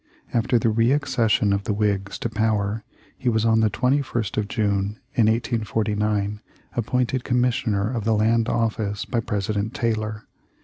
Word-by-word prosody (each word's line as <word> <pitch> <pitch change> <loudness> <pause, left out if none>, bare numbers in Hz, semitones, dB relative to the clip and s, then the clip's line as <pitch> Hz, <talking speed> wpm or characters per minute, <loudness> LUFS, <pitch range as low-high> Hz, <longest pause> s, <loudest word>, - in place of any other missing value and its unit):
After 120 +1 +2
the 115 -1 +2
re 115 +3 +3
accession 115 -7 +2
of 100 0 -1
the 105 - 0
Whigs 100 -2 0
to - - 0
power 110 -1 0 0.3
he 125 - -1
was 110 -1 +1
on 110 -1 +4
the 110 -1 +3
21st 125 -2 0
of 105 -1 -1
June 100 -2 0 0.2
in 115 -6 +3
184 115 -1 0
9 105 0 -1 0.3
appointed 125 +2 0
Commissioner 120 -4 +1
of 115 -4 -2
the 110 +1 +2
Land 115 +2 +2
Office 110 -3 -1
by 120 - -1
President 105 0 -2
Taylor. 110 -2 -2
110 Hz, 160 wpm, -23 LUFS, 105-115 Hz, 0.3 s, on